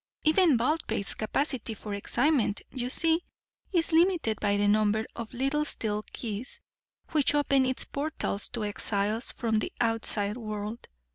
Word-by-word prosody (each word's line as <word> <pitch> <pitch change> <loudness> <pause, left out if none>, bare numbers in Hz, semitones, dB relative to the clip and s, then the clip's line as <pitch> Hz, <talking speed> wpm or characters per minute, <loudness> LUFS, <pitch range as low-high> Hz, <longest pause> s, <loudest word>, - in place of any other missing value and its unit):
Even 315 -3 +4
Baldpate's 250 -4 -1
capacity 235 0 -2
for 210 0 -7
excitement, 240 +2 +1
you 250 -1 -3
see, 325 +4 +6 0.5
is 345 -3 +3
limited 325 - +2
by 205 -1 +1
the 205 0 +2
number 215 +1 +2
of 230 -2 -6
little 275 +4 0
steel 215 -7 -2
keys 225 +2 -5 0.5
which 295 -2 +3
open 275 -2 +3
its 260 - -1
portals 285 -8 -3
to 235 -3 -3
exiles 205 +2 -1
from 225 -2 0
the - - -3
outside 225 -2 0
world. 215 0 -6
235 Hz, 140 wpm, -28 LUFS, 215-290 Hz, 0.5 s, see